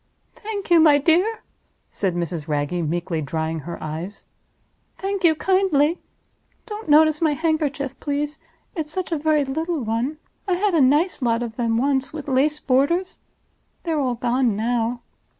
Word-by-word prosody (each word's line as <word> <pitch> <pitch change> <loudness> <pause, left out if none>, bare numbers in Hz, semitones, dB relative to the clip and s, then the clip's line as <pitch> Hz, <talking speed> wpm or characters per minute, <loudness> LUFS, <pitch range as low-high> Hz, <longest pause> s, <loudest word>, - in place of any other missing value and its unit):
"Thank 415 -4 -6
you, 340 - +7
my 305 -2 +6
dear," 350 +9 +2 0.5
said 190 -4 -1
Mrs. 170 -3 -3
Wragge, 145 -2 -1 0.2
meekly, 170 -1 -2
drying 160 +2 -2
her 170 +4 -7
eyes; 160 +6 -6 0.7
"thank 390 0 -3
you 325 -2 +5
kindly. 350 -3 +2 0.7
Don't 430 -4 -7
notice 310 +1 +5
my 315 -2 +3
handkerchief, 300 -4 -1
please. 295 +1 -2 0.4
It's 315 -4 -3
such 360 +3 -4
a 325 - +1
very 305 -1 +2
little 315 +2 -2
one! 230 +7 -2 0.3
I 375 - +2
had 395 +1 +1
a 325 - +4
nice 295 +7 +3
lot 235 -1 +1
of 225 -2 -6
them 230 -2 0
once, 270 +1 +1
with 300 -2 -7
lace 290 +3 +2
borders. 290 +9 +1 0.6
They're 325 -3 -1
all 255 -3 0
gone 240 -1 +1
now. 235 +2 -1
285 Hz, 155 wpm, -22 LUFS, 230-325 Hz, 0.7 s, you